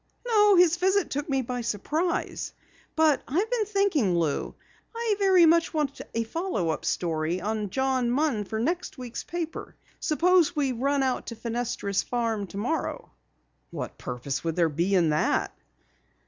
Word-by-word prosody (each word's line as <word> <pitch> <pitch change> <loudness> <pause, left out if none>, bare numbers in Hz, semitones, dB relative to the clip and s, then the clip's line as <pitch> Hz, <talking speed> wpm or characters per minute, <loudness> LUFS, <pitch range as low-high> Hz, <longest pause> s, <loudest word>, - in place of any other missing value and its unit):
"No, 420 -4 +5
his 350 -1 +5
visit 380 +2 +1
took 290 +2 -3
me 270 -1 +1
by 245 +1 -3
surprise. 300 - -2 0.4
But 315 -3 +4
I've 375 - 0
been 465 -4 +1
thinking, 360 - +2
Lou. 160 -4 -1 0.4
I 460 -2 0
very 380 -3 +6
much 330 0 +3
want 295 -3 -1
a 230 - +1
follow 225 - -2
up - - -4
story 165 0 -1
on 210 +1 -2
John 260 +1 0
Munn 255 -5 +1
for 220 +2 -4
next 345 +9 -2
week's 245 -2 -6
paper. 335 -2 -5 0.2
Suppose 350 +2 +3
we 280 -3 +1
run 275 +3 0
out 260 -1 -1
to 230 - -5
Fenestra's 230 -3 -2
farm 225 -4 -2
tomorrow." 220 - -3 0.6
"What - - -6
purpose 130 +2 -4
would 165 -1 -2
there 170 -2 +3
be 170 +6 0
in 170 -4 +3
that?" 150 0 +1
265 Hz, 155 wpm, -27 LUFS, 205-340 Hz, 0.6 s, very